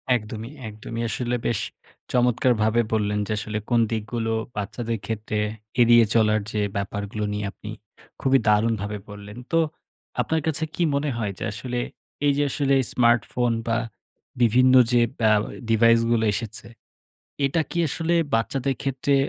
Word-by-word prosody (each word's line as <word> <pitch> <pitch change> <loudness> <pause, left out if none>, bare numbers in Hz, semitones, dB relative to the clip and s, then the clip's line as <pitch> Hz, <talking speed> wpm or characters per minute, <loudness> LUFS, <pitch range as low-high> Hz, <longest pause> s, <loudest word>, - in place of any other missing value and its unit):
একদমই, 110 +1 -5 0.2
একদমই। 110 +2 -6
আসলে 125 0 -1
বেশ 115 - 0 0.5
চমৎকারভাবে 120 -2 +3
বললেন 105 -1 +1
যে - - -4
আসলে 110 0 -4
কোন 120 - +3
দিকগুলো 115 +1 -2 0.2
বাচ্চাদের 115 +2 -3
ক্ষেত্রে 110 -1 -3 0.4
এড়িয়ে 120 -1 +7
চলার 110 -1 +3
যে 105 - -1
ব্যাপারগুলো 100 +1 -3
নিয়ে 105 0 -2
আপনি 105 - -10 0.5
খুবই 135 0 +4
দারুণভাবে 105 -1 +2
বললেন। 105 +2 -10
তো 165 - +4 0.6
আপনার 160 0 0
কাছে 160 0 +1
কি 175 - +1
মনে 145 +1 0
হয়? 105 -3 -2
যে - - -4
আসলে 120 +4 -4 0.5
এই 145 - +4
যে 145 - +3
আসলে 140 0 +2 0.2
স্মার্টফোন 120 0 +2 0.2
বা 115 0 +2 0.6
বিভিন্ন 125 +3 +5 0.2
যে 120 -1 +4 0.2
ব্যা 110 -1 +4 0.4
ডিভাইস 115 +1 +5
গুলো 110 -1 +2
এসেছে। 110 +1 -5 0.8
এটা 160 +4 +1
কি - - -5
আসলে 165 +4 -1 0.2
বাচ্চাদের 130 +4 0
ক্ষেত্রে 135 +1 0
115 Hz, 140 wpm, -24 LUFS, 105-125 Hz, 0.8 s, এড়িয়ে